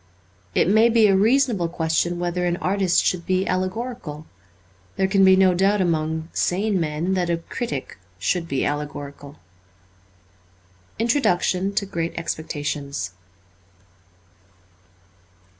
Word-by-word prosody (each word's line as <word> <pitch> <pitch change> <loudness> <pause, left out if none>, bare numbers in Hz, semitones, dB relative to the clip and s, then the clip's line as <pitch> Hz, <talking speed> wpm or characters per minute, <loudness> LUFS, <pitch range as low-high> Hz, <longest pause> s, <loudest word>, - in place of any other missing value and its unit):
It - - +3
may 220 +4 +5
be 230 -1 +4
a 195 -2 +4
reasonable 220 -3 +2
question 165 +1 0
whether 175 0 -2
an 175 0 0
artist 190 -1 +1
should 180 -2 0
be 185 +1 0
allegorical. 185 -4 -3 0.7
There 190 - +1
can 195 0 +3
be 190 0 +7
no 190 -1 +4
doubt 195 +3 +2
among 160 -2 -1
sane 195 +2 0
men 160 +3 -1
that 180 -2 0
a 170 - +1
critic 165 - -5 0.2
should 170 - -1
be 135 -4 -1
allegorical. 145 -1 -5 1.6
Introduction 200 -5 +1
to 200 - 0
'Gr/at 170 -3 -3
Exfeetations.' 145 - -4
180 Hz, 115 wpm, -23 LUFS, 160-195 Hz, 1.6 s, be